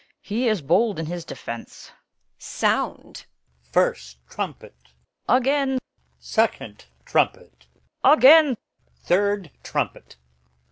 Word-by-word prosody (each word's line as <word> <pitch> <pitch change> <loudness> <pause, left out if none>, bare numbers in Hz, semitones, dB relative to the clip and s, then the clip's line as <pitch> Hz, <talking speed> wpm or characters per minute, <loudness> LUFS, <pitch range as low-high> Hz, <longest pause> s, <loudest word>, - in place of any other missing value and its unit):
He 235 +5 -1
is 215 -8 0
bold 195 +9 +2
in 165 - -3
his 175 +1 -5
defence.' 115 -7 -9
Edm. - - -37
Sound! - - -2 0.4
First 60 +1 -1
trumpet. - - -7 0.5
Her. 250 - +6
Again! 270 +1 +1 0.4
Second 60 +1 -2 0.2
trumpet. 60 -1 -1 0.4
Her. 275 - +7
Again! 300 -2 +7 0.5
Third 200 -2 0
trumpet. - - -4
205 Hz, 100 wpm, -23 LUFS, 155-260 Hz, 0.5 s, Her